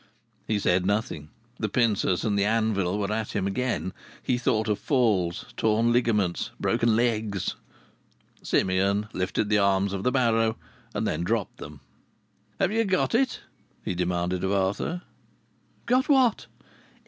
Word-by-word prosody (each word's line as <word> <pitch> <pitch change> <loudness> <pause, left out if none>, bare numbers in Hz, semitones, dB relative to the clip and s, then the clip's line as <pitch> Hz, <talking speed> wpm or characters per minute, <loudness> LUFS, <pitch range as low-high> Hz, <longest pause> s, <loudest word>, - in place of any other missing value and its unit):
He 110 - +1
said 90 -2 +2
nothing. 95 -7 -2 0.3
The 110 - -1
pincers 105 -6 +1
and 105 -2 +1
the 100 - +2
anvil 105 -3 +1
were 100 -1 -2
at 110 0 -3
him 95 - 0
again. 100 -1 -2 0.3
He 125 - 0
thought 110 -2 +1
of 105 -1 0
falls, 105 - +1
torn 110 +2 +2
garments, 105 -7 0
broken 115 -1 +2
legs. 110 -4 0 0.9
Simeon 100 +3 +1
lifted 95 +3 -1
the 105 -1 +3
arms 100 0 +2
of 100 - -3
the 125 - +1
barrow, 115 -3 +2 0.4
and - - -1
then 80 +3 -1
dropped 110 +2 -1
them. 75 -2 -10 0.8
"Have 195 -1 +2
you 225 +1 +2
got 190 0 0
it?" 255 +3 +1 0.4
he - - -1
demanded 90 0 -1
of 95 - 0
Arthur. 100 - -1 0.8
"Got 255 +4 +2
what?" 260 -6 +3
105 Hz, 145 wpm, -26 LUFS, 95-115 Hz, 0.9 s, the